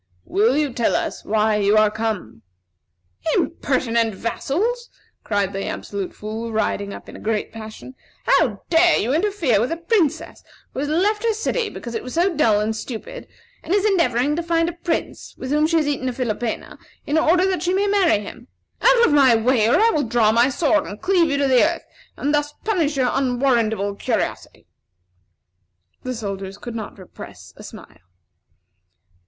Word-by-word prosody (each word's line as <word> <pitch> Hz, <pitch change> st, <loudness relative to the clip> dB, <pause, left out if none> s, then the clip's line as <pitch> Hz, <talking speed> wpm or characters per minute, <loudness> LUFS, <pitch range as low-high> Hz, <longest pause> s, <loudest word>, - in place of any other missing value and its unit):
Will 225 Hz, +7 st, +2 dB
you 295 Hz, -4 st, 0 dB
tell 235 Hz, -1 st, +1 dB
us -, -, -3 dB
why 215 Hz, 0 st, +1 dB
you 205 Hz, +1 st, +3 dB
are 215 Hz, -1 st, +4 dB
come?" 210 Hz, -, -4 dB, 0.9 s
"Impertinent 230 Hz, -3 st, 0 dB
vassals!" 430 Hz, -, -2 dB, 0.3 s
cried 200 Hz, -2 st, -1 dB
the 195 Hz, 0 st, -4 dB
Absolute 200 Hz, -2 st, -5 dB
Fool, 220 Hz, +2 st, -5 dB
riding 205 Hz, -2 st, -1 dB
up -, -, -10 dB
in -, -, -11 dB
a -, -, -9 dB
great 215 Hz, -1 st, -2 dB
passion. 220 Hz, +3 st, -9 dB, 0.3 s
"How 235 Hz, -, +2 dB
dare 345 Hz, +1 st, +5 dB
you 240 Hz, +5 st, 0 dB
interfere 330 Hz, -, +1 dB
with 245 Hz, -, -1 dB
a 330 Hz, -, -2 dB
princess 335 Hz, -3 st, -1 dB, 0.3 s
who -, -, -5 dB
has 290 Hz, +1 st, -2 dB
left 410 Hz, +7 st, +1 dB
her 460 Hz, -1 st, +2 dB
city 450 Hz, +1 st, -1 dB
because 235 Hz, -, -8 dB
it 225 Hz, -, -3 dB
was 255 Hz, -, -8 dB
so 350 Hz, +1 st, +2 dB
dull 225 Hz, -8 st, +3 dB
and 215 Hz, +1 st, -1 dB
stupid, 260 Hz, -, -7 dB, 0.3 s
and 370 Hz, -, -1 dB
is 410 Hz, 0 st, +1 dB
endeavoring 295 Hz, -, +2 dB
to 340 Hz, -, -1 dB
find 335 Hz, 0 st, +1 dB
a -, -, -6 dB
prince, 340 Hz, -1 st, -4 dB
with 260 Hz, -, -6 dB
whom 300 Hz, +1 st, +3 dB
she 330 Hz, 0 st, +2 dB
has 305 Hz, -2 st, +1 dB
eaten 265 Hz, -3 st, -1 dB
a -, -, -4 dB
philopena, 235 Hz, -2 st, -4 dB, 0.3 s
in 300 Hz, +2 st, +1 dB
order 355 Hz, +4 st, +3 dB
that 375 Hz, -3 st, 0 dB
she 355 Hz, +1 st, 0 dB
may 390 Hz, +2 st, +1 dB
marry 395 Hz, -, +3 dB
him. 240 Hz, +4 st, -11 dB, 0.3 s
Out -, -, +5 dB
of 300 Hz, -, +2 dB
my 270 Hz, -5 st, +6 dB
way, 225 Hz, -1 st, +2 dB
or 300 Hz, -, +4 dB
I 455 Hz, +2 st, +4 dB
will 305 Hz, -, +1 dB
draw 220 Hz, -2 st, +3 dB
my 235 Hz, +3 st, +4 dB
sword 305 Hz, +2 st, +1 dB
and 205 Hz, -, -8 dB
cleave 360 Hz, -4 st, +2 dB
you 285 Hz, -, 0 dB
to 280 Hz, -1 st, +1 dB
the 255 Hz, -2 st, +5 dB
earth, 335 Hz, +2 st, -1 dB, 0.3 s
and 290 Hz, +2 st, -1 dB
thus 295 Hz, 0 st, 0 dB
punish 330 Hz, -10 st, 0 dB
your 255 Hz, -2 st, +2 dB
unwarrantable 240 Hz, -6 st, +1 dB
curiosity!" -, -, -3 dB, 1.4 s
The 255 Hz, 0 st, -4 dB
soldiers 195 Hz, -3 st, -5 dB
could 240 Hz, -, -8 dB
not 220 Hz, -2 st, -7 dB
repress 185 Hz, -2 st, -12 dB
a -, -, -13 dB
smile. -, -, -12 dB
260 Hz, 180 wpm, -21 LUFS, 220-335 Hz, 1.4 s, my